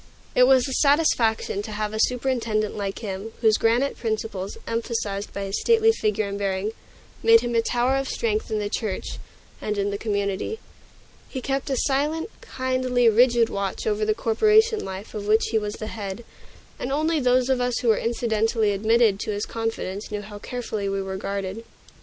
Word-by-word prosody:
It 250 0 +6
was 260 0 +5
a 265 - -3
satisfaction 255 -9 +2
to 215 +1 -7
have 210 0 -2
a 220 - -3
superintendent 235 -5 0
like 200 -1 -3
him, 200 +3 -5
whose 220 -2 +4
granite 240 +5 +2
principles, 215 -4 -3
emphasized 225 -3 -3
by 200 - -4
his 195 0 -2
stately 450 -1 +5
figure 215 - 0
and 200 0 -4
bearing, 195 +1 -1 0.5
made 230 0 +6
him 240 0 -3
a 230 - +3
tower 245 +3 +1
of 270 -1 -2
strength 220 -2 -1
in 220 - -1
the 210 -1 -1
church 210 -2 -3 0.4
and 210 -1 -2
in 200 0 0
the 200 - -4
community. 200 - -2 0.7
He 260 - -4
kept 270 +2 -2
a 270 - +1
silent, 300 - 0
kindly, 255 -2 +1
rigid 235 +1 +4
watch 200 -1 -3
over 215 0 0
the 215 0 +1
corporation 430 - +3
life 190 +2 -7
of 205 -2 -5
which 220 +1 +3
he 220 - +3
was 210 0 -4
the 215 - -6
head; 210 0 -6 0.5
and 250 - -3
only 310 +3 +1
those 250 -1 +3
of 260 -2 +1
us 245 -1 0
who 240 - +1
were 220 - +4
incidentally 225 -2 +1
admitted 215 0 +3
to 215 - -3
his 205 0 -2
confidence 225 -3 -4
knew 210 -1 -4
how 205 0 -9
carefully 220 -4 -4
we 195 0 -1
were 190 0 -4
guarded. 200 +2 -4
225 Hz, 185 wpm, -24 LUFS, 205-250 Hz, 0.7 s, It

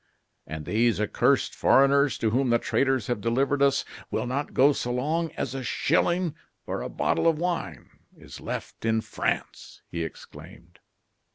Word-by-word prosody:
"And 80 -1 -6
these 115 0 +2
accursed 105 - +2
foreigners 140 +1 +4
to 110 - 0
whom 130 +2 +1
the 120 - +4
traitors 130 -1 0
have 120 -4 -2
delivered 135 +5 +1
us, 140 0 +3 0.2
will - - -2
not 135 +4 -3
go 140 +3 +5
so 125 - -3
long 155 +6 -1
as 125 - -3
a 135 - -4
shilling 170 +4 +1 0.3
or - - -3
a - - -4
bottle 80 - 0
of 165 -2 +3
wine 170 - -3 0.3
is - - -12
left - - -6
in 110 0 +1
France!" - - -4
he 85 -1 -2
exclaimed. 80 - -11
130 Hz, 160 wpm, -26 LUFS, 115-145 Hz, 0.3 s, go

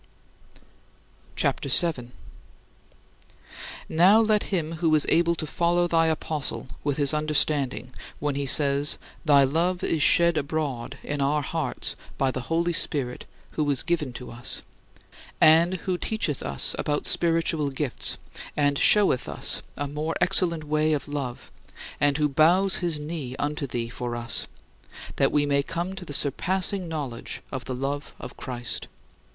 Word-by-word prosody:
CHAPTER - - -1
VII 160 -9 +4
8. - - -20 1.8
Now 185 +7 +5
let 215 -2 +2
him 165 -4 -2
who 160 -2 +2
is 150 - +2
able 170 +1 +3
follow 170 +3 0
thy 165 -1 +2
apostle 155 -2 -2 0.2
with 145 -2 -1
his 145 -1 +1
understanding 150 -4 0 0.2
when 145 0 -2
he 140 0 -3
says, 140 +1 +3 0.3
"Thy 145 -2 +6
love 170 +6 0
is 160 - 0
shed 170 +2 +5
abroad 140 -5 -3
in 145 -1 -3
our 145 +2 +1
hearts 155 -3 -1 0.2
by 135 -1 +1
the 130 - -4
Holy 170 +1 +1
Spirit, 140 -6 -1 0.3
who 150 -2 -1
is 140 -3 +1
given 165 -6 -1
to 125 - -9
us" 120 +1 -2 0.8
and 165 +4 +6
who 185 -2 -1
teacheth 185 -11 -1
us 70 -2 +1
about 145 0 -1
spiritual 165 -3 +1
gifts 135 -1 0 0.4
and 145 -1 +2
showeth 200 -12 +4
us - - -2 0.2
a 145 - -2
more 150 +3 -3
excellent 175 -4 +2
way 155 +1 +1
of 145 - -2
love; 140 -4 -5 0.5
and 145 -1 +2
who 150 -1 +2
bows 175 +7 +4
his 170 -4 -1
knee 150 -4 -5
unto 145 +1 -3
thee 120 -2 -3
for 120 0 -5
us, 120 0 -3 0.7
that - - +3
we 145 -1 +2
may 140 -1 +2
come 170 +5 -4
to 190 -2 -8
the 150 - -8
surpassing 185 +7 +1
knowledge 145 -7 -5
of 130 -2 -5
the 130 - -3
love 140 +3 -4
of 125 - -9
Christ. 120 -2 -5
150 Hz, 150 wpm, -25 LUFS, 140-170 Hz, 1.8 s, Thy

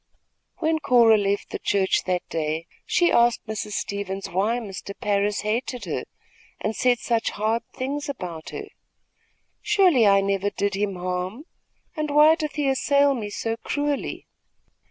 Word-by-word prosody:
When 320 -2 +1
Cora 235 -6 +5
left 200 -1 -1
the - - -4
church 195 -2 +1
that 180 -1 -1
day, 160 0 -2 0.2
she 345 -1 +3
asked 235 0 +3
Mrs. 215 -1 -4
Stevens 200 -1 -3
why 205 +6 +1
Mr. 200 -3 -7
Parris 205 0 0
hated 235 +3 -2
her - - -3 0.5
and 215 +1 -2
said 250 -1 +3
such 230 -1 0
hard 220 +2 -1
things 285 +3 -3
about 175 - -6
her. - - -6 1.0
"Surely 345 - +4
I 195 0 +5
never 195 0 0
did 200 0 -1
him 200 0 -1
harm, 180 +7 -3 0.5
and 305 -2 -2
why 300 +2 +6
doth 305 -2 -3
he 295 -2 0
assail 280 +1 +3
me 220 -5 -4
so 225 +2 -3
cruelly?" 290 +3 -2
220 Hz, 150 wpm, -24 LUFS, 200-270 Hz, 1.0 s, why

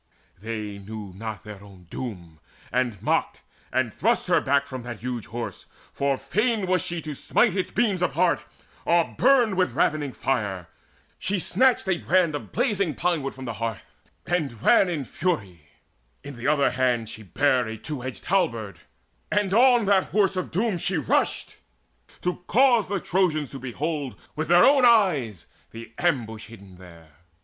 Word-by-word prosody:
They 105 -2 -5
knew 105 -1 -8
not 110 0 -6
their 105 -2 -10
own 95 -3 -15
doom, 85 -11 -7 0.3
And 120 -4 0
mocked, - - 0 0.3
and 120 -4 0
thrust - - +1
her - - +4
back 140 +1 +2
from 130 -2 -7
that 120 -3 -8
huge 120 -3 -4
Horse 120 +1 -6 0.3
For 140 -1 0
fain 225 - 0 0.2
she 175 - -3
was 165 - -5
to 155 - -5
smite 200 - +1
its 190 - -1
beams 205 -5 0
apart, 170 -4 +2 0.4
Or 170 -1 +2
burn 245 -5 +4
with 185 -1 +1
ravening 150 -3 +1
fire. 100 -9 -2 0.5
She 205 - -1
snatched 250 +4 +2
a 185 -3 +1
brand 180 -3 +2
Of 145 - -6
blazing 200 - 0
pine 175 -2 0
wood 135 0 -5
from 130 0 -8
the 115 - -4
hearth 115 -2 -5 0.3
and 140 -11 -2
ran 190 - +5
In 155 -6 -3
fury: 95 - -3 0.5
in 140 -1 -8
the 120 +3 -4
other 145 -2 +3
hand 125 -3 0
she 110 - -8
bare 125 - +1
A 110 0 -5
two 145 +4 -6
edged 130 -1 -7
halberd: 115 - 0 0.5
on 220 +4 +4
that 195 -1 +3
Horse 200 -2 +1
of 185 - -3
Doom 195 +1 0
She 180 +1 0
rushed, 145 - 0 0.7
to 180 0 -1
cause 245 -4 +4
the 200 0 -1
Trojans 170 -6 0
to 135 - -7
behold 140 +2 -4 0.2
With 155 +1 -2
their 175 +1 +6
own 275 -1 +5
eyes 155 - +3 0.2
the 115 0 -11
ambush 115 -11 -1
hidden 100 -5 -14
there. 85 -4 -16
140 Hz, 165 wpm, -25 LUFS, 115-185 Hz, 0.7 s, their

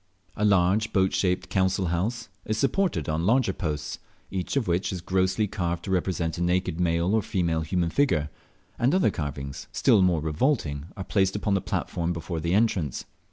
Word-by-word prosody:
A 105 - -2
large 100 +2 +3
boat 95 -1 +2
shaped 90 0 0
council 95 0 +1
house 110 +8 -2 0.2
is 110 +2 -2
supported 135 - +1
on 80 +3 0
larger 120 -3 +3
posts, 75 -5 -4 0.3
each 95 +8 -2
of 125 - 0
which 90 +2 0
is 95 - -3
grossly 95 +3 +1
carved 85 -4 -3
to 95 - -4
represent 90 -3 -1
a - - -2
naked 90 -1 0
male 85 +2 +1
or 110 - +3
female 85 -5 0
human 85 0 -1
figure, 80 - +1 0.5
and 130 +8 +3
other 190 - +3
carvings 70 -3 -5
still - - +4
more 90 -3 +3
revolting 75 - 0
are 95 - -4
placed 95 0 +1
upon 105 0 0
the 95 - +2
platform 85 0 -2
before 85 0 -4
the 85 +3 0
entrance. 95 - 0
90 Hz, 180 wpm, -26 LUFS, 85-100 Hz, 0.5 s, still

